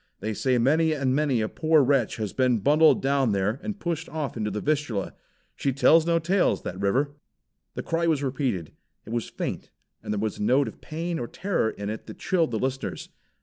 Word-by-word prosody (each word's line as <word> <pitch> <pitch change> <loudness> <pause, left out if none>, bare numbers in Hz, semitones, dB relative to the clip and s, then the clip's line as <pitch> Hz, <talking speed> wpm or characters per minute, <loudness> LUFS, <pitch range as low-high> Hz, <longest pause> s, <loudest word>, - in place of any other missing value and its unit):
They 110 +3 -3
say 130 +4 +1
many 155 +6 +3
and 135 -3 0
many 140 -5 +1
a 110 - 0
poor 155 +3 +3
wretch 130 -4 +2
has 110 -3 -4
been 130 -2 +2
bundled 150 +9 +4
down 135 -4 +2
there 100 +5 0
and 210 -2 -5
pushed 170 -1 -3
off 155 -3 -4
into 105 -2 -2
the 105 +1 -3
Vistula. 140 -8 -1 0.4
She 135 - 0
tells 160 +5 +4
no 170 0 +3
tales, 180 +4 +1
that 90 - -5
river." 130 +9 +1 0.6
The - - -4
cry 165 +1 0
was 150 -4 +1
repeated. 130 - -2 0.3
It 110 - -9
was 120 -1 -2
faint, - - -5 0.3
and - - -5
there 105 - -1
was 110 0 -2
a - - -4
note 130 +6 +3
of - - -9
pain 165 +2 -4
or 120 - -3
terror 185 - -1
in 100 -1 -5
it 110 - -7
that - - -9
chilled 170 -5 +1
the 115 - -2
listeners. 130 +3 -3
135 Hz, 210 wpm, -26 LUFS, 110-155 Hz, 0.6 s, bundled